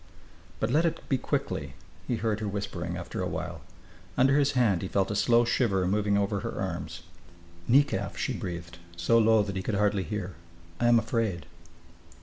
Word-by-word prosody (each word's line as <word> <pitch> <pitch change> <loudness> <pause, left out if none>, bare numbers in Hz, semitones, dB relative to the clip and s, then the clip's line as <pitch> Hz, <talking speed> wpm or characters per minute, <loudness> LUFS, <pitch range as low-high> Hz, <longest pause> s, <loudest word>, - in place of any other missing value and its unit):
"But 110 - 0
let 155 +5 +4
it 170 - -2
be 135 - +2
quickly," 70 - -2 0.3
he 125 - 0
heard 110 -2 -1
her 110 - -3
whispering, 90 -4 -4
after 85 - -5
a - - -1
while. - - -5 0.6
Under 135 +2 +5
his 140 0 +2
hand 115 -9 +2
he 95 - -3
felt 95 +2 0
a - - -1
slow 115 +3 +4
shiver 100 -6 +1
moving 100 +2 +1
over 100 0 0
her - - -5
arms. - - -4 0.6
"Nekaf!" 115 -7 +2
she 130 - -1
breathed, 85 -6 -6 0.2
so 115 +7 +3
low 110 -1 +5
that 100 -1 -5
he 95 - -1
could 105 +2 -2
hardly 105 -1 +2
hear. 95 0 -4 0.5
"I 120 - +3
am 120 0 +6
afraid." 115 -7 -1
105 Hz, 180 wpm, -28 LUFS, 95-120 Hz, 0.6 s, am